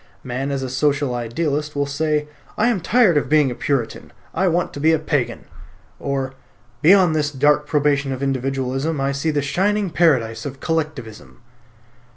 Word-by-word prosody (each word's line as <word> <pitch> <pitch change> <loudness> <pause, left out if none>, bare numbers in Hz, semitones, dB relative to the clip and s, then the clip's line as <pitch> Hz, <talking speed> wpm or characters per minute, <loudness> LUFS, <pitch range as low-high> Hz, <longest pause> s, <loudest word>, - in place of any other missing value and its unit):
Man 130 +2 -3
as 135 -1 -2
a 130 - -4
social 140 -1 0
idealist 145 +5 -2
will 145 0 0
say 150 +1 -1 0.3
"I 225 +3 +3
am 230 -5 0
tired 200 -2 +3
of 145 - 0
being 150 -3 +3
a - - -2
Puritan; 120 -2 -3 0.2
I 185 +3 +1
want 175 0 0
to - - -7
be 160 +3 +3
a - - +4
Pagan," 150 -4 -2 0.5
or 135 -1 -3 0.5
"Beyond 180 -1 +5
this 150 -2 +1
dark 145 +1 +2
probation 145 -2 +1
of 130 +1 -4
Individualism 135 +2 -1
I 135 0 0
see 140 +3 -2
the 145 -2 0
shining 195 +6 0
paradise 120 -10 +2
of 135 -1 -7
Collectivism." 145 -9 -4
145 Hz, 170 wpm, -21 LUFS, 135-160 Hz, 0.5 s, Beyond